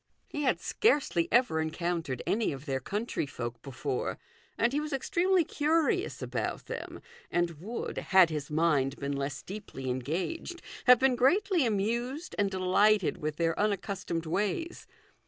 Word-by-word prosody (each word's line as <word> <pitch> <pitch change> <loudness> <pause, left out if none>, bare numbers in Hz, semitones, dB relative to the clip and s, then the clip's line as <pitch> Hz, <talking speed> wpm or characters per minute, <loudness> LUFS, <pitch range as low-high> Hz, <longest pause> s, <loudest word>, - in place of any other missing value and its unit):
He 295 - -4
had 270 - +2
scarcely 285 - +2
ever 235 -9 +3
encountered 160 -4 -2
any 220 +2 +1
of 135 0 -7
their 135 -3 -1
country 205 - -3
folk 120 -4 -6
before, 135 0 -3 0.4
and 240 +3 +2
he 290 - +2
was 300 -1 -4
ex 270 - -3
tremely 370 -2 +3
curious 325 +6 +1
about - - -3
them, - - -6 0.3
and 175 -1 +1
would, 225 +6 -4
had 185 -4 +5
his 150 -2 -4
mind 150 -4 +2
been 140 0 -3
less 140 0 -3
deeply 185 -10 -5
engaged, 180 - -3 0.2
have 250 -1 +9
been 260 +1 +3
greatly 345 - +3
amused 235 - -1
and 200 -1 +3
delighted 190 +1 +3
with 155 0 -3
their 165 +1 +1
unaccustomed 195 -4 -1
ways. 210 - -2
195 Hz, 150 wpm, -30 LUFS, -, 0.4 s, have